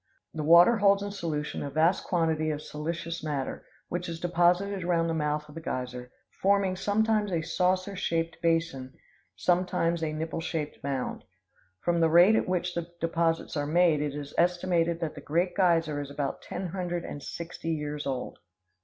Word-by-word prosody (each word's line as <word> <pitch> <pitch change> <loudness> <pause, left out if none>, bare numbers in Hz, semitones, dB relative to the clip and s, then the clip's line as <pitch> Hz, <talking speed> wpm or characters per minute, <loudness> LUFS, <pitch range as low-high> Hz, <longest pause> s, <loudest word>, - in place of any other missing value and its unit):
The 155 - -3
water 170 +9 +7
holds 200 -1 +4
in 205 - -4
solution 160 -6 -3
a 140 - -3
vast 160 +6 +2
quantity 160 -3 +1
of 150 -1 -3
silicious 165 +2 -4
matter, 145 -4 -3 0.2
which 175 0 -3
is 165 -1 -5
deposited 175 +3 +2
around 170 -1 +2
the 165 - -1
mouth 150 -1 -1
of 150 - -13
the 165 - -7
geyser, 125 -4 -4 0.3
forming 195 -1 +3
sometimes 210 +1 +1
a 165 -2 0
saucer 185 +3 0
shaped 165 -2 -2
basin, 165 -6 0 0.4
sometimes 175 -2 +1
a 160 -1 -1
nippleshaped 160 0 -4
mound. 135 -2 -3 0.6
From 175 -1 +1
the 165 -1 +4
rate 175 +6 +7
at 220 - 0
which 180 -1 0
the 170 -1 -3
deposits 165 0 0
are 145 -1 -1
made, 165 -1 +3
it 145 -1 -2
is 145 -1 -6
estimated 175 -1 +2
that 160 -2 -2
the - - -9
Great 175 +4 0
Geyser 165 -6 +2
is 140 - -7
about 140 -1 -3
ten 185 - -5
hundred 175 -1 -3
and 145 - -6
sixty 165 +2 -6
years 150 -2 -3
old. 130 -2 -4
165 Hz, 170 wpm, -28 LUFS, 150-180 Hz, 0.6 s, water